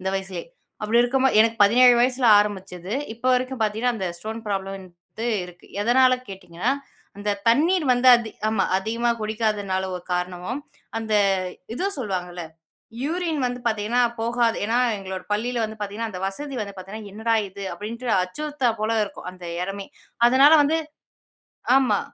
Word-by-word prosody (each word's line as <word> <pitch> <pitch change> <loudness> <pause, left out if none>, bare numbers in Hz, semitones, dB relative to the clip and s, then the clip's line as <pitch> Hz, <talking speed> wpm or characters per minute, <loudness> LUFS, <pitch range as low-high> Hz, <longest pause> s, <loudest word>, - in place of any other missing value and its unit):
இந்த 190 - -3
வயசுலயே. 190 -1 -4 0.4
அப்டி 225 +3 +2
இருக்கும்போது 260 -1 +2
எனக்கு 225 +1 +3
17 245 +4 +6
வயசுல 250 0 +2
ஆரம்பிச்சது, 195 -2 -3 0.2
இப்ப 235 +2 -26
வரைக்கும் 255 -1 -2
பார்த்தீங்கன்னா 220 +3 0
அந்த 190 -4 -2
ஸ்டோன் 220 +3 -6
ப்ராப்ளம் 195 -1 -2
வந்து 185 +4 -9 0.2
இருக்கு. 180 0 -14
எதனால 255 +3 +4 0.2
கேட்டீங்கன்னா, 190 +4 -3 0.5
அந்த 205 0 -1 0.2
தண்ணீர் 320 +8 +3
வந்து 245 +1 +4
அதி 225 -2 -5 0.2
ஆமா. 220 -3 +1
அதிகமா 230 +4 -1
குடிக்காததுனால 210 -3 -1
ஒரு 180 - -9
காரணமும் 180 +7 -3 0.4
அந்த 220 -1 -2 0.6
இது 370 +9 -1
சொல்வாங்கல்ல, 180 -6 -4 0.6
யூரின் 325 +1 -1
வந்து 245 0 -4
பார்த்தீங்கன்னா 220 +2 +1 0.2
போகாத 235 0 +1
ஏனா, 225 +3 0 0.2
எங்களோட 190 -1 -6
பள்ளியில 235 +3 -1
வந்து 220 0 -6
பார்த்தீங்கனா 210 +3 -3
அந்த 180 - -7
வசதி 275 +9 -5
வந்து 200 -1 -5
பார்த்தீங்கன்னா 200 +2 -8
என்னடா 225 +2 0
இது 200 +1 -10
அப்டின்ட்டு 230 +3 -5
அச்சுறுத்தல 290 +6 -1
போல 220 +1 +1
இருக்கும். 200 - -10
அந்த 180 -1 -13 0.2
இடமே. 195 +1 -5 0.4
அதனால 270 +5 +6
வந்து 305 +3 +2 1.0
ஆமா, 245 -7 +2
220 Hz, 145 wpm, -23 LUFS, 195-245 Hz, 1.0 s, 17